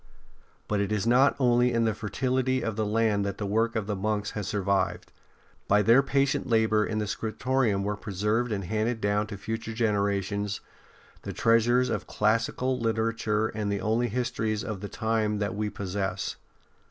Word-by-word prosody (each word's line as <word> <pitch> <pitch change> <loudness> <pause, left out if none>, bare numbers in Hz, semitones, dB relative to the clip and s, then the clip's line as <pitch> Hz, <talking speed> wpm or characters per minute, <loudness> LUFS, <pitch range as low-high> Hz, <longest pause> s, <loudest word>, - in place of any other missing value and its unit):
But 105 -1 0
it 100 0 -1
is 105 0 0
not 125 +4 +4
only 125 -1 +3
in 115 -1 +2
the 110 - +1
fertility 130 +4 -1
of 110 -2 -2
the 110 -1 -1
land 105 -1 +2
that 100 -1 -3
the 105 - -3
work 115 +4 +1
of 110 -3 -1
the 105 0 -2
monks 105 +1 -1
has 105 -3 -4
survived. 100 -2 -1 0.6
By 105 +1 +4
their 115 +5 +6
patient 140 0 0
labour 110 -2 +3
in 110 0 -2
the 105 - 0
scriptorium 110 -1 0
were 105 +1 -1
preserved 105 +5 -1
and 100 -2 -2
handed 110 +5 -1
down 105 0 0
to 100 -1 -7
future 110 +2 -4
generations 100 -2 0 0.6
the - - -6
treasures 120 +2 +3
of - - -3
classical 115 +4 0
literature 110 -1 0
and 105 -2 -3
the 100 - -1
only 115 +2 +1
histories 110 -2 -2
of 110 -6 -5
the 105 - -5
time 110 -2 0
that 105 0 -2
v/e 105 +1 -2
possess. 95 -1 -3
110 Hz, 175 wpm, -27 LUFS, 105-115 Hz, 0.6 s, their